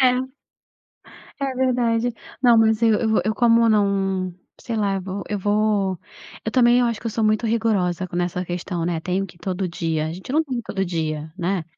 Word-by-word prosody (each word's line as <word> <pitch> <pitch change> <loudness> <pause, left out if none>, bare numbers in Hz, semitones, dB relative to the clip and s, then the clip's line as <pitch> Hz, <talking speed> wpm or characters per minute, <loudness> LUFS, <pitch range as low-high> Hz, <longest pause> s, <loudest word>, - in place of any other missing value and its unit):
É. 255 0 +3 1.1
É 270 -1 -1
verdade. 245 -2 +1 0.3
Não, 240 -2 +6
mas 220 0 +3
eu 225 -2 +5
eu 220 -5 +1
eu 215 0 0
como 230 -1 +4
não, 195 -3 +1 0.3
sei 230 -2 -4
lá, 200 -2 +1
vou 190 +2 -5
eu 205 -1 -2
vou 205 -2 +1 0.5
eu 220 - -1
também, 245 -1 +5
eu 245 - +3
acho 230 -2 -2
que 230 - -6
eu - - -1
sou 220 0 -1
muito 215 +2 +2
rigorosa 195 -6 0
nessa 180 +1 -1
questão, 175 -1 -3
né, 170 -2 -1
"Tenho 185 +3 -1
que 175 - -16
ir - - -22
todo 185 0 -2
dia", 160 -2 -2
a 160 - -4
gente 190 +8 -9
não 315 +2 +3
tem 265 -3 -4
que 235 - -1
ir - - -13
todo 195 -3 -2
dia, 155 -3 -3
né 180 0 -1
205 Hz, 210 wpm, -22 LUFS, 180-230 Hz, 1.1 s, Não